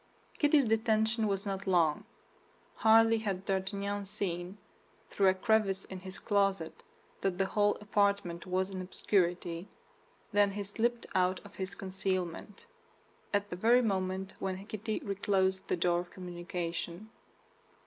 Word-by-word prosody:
Kitty's 295 -2 +5
detention 220 0 +2
was 195 0 -1
not 195 -1 -3
long. 165 -5 +2 0.7
Hardly 225 0 +6
had 195 -3 -3
D'Artagnan 200 +1 -1
seen, 190 -2 -3 0.5
through 195 - +3
a 190 - +5
crevice 195 -1 +1
in 190 - -7
his 185 0 -8
closet, 195 -5 0 0.4
that 190 -2 0
the 195 - +2
whole 205 +1 +2
apartment 200 -4 0
was 185 +1 0
in 185 -1 -4
obscurity, 180 -1 0 0.7
than 205 -1 +4
he 205 0 -3
slipped 235 +4 -1
out 185 0 +2
of 205 - -12
his 190 -1 -5
concealment, 190 0 -3 0.7
at 205 0 0
the - - -2
very 235 +7 +4
moment 190 -2 -1
when 190 0 -3
Kitty 215 - -3
reclosed 190 -1 0
the - - 0
door 175 0 +2
of 175 0 -6
communication. 175 +2 -5
195 Hz, 135 wpm, -32 LUFS, 185-205 Hz, 0.7 s, Hardly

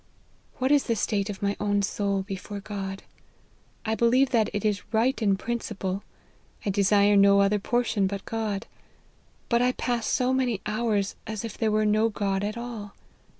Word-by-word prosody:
" - - -34
What 260 +2 +1
is 290 -1 +4
the 230 - +1
state 205 -1 -1
of 205 -1 -6
my 200 0 +1
own 205 -1 +1
soul 200 0 -1
before 200 +1 -6
God? 195 -1 -6 0.8
I 220 - 0
believe 245 +4 +3
that 225 -4 +3
it 205 0 -3
is 205 -2 +1
right 235 +4 +1
in 200 -3 +3
principle: 200 -4 -3 0.6
I 200 - +1
desire 200 +1 +4
no 200 0 +6
other 200 +1 +3
portion 230 -2 +1
but 200 0 -5
God: 220 -2 -3 0.8
but 235 0 +2
I 250 +1 +3
pass 240 -3 -1
so 255 0 +1
many 250 -5 +1
ho\irs 210 -2 0
as 220 0 -4
if 225 - -6
there 225 - 0
were 215 0 +2
no 215 +2 +3
God 200 -2 -1
at 210 +2 -3
all. 230 -4 -7
210 Hz, 180 wpm, -26 LUFS, 200-230 Hz, 0.8 s, no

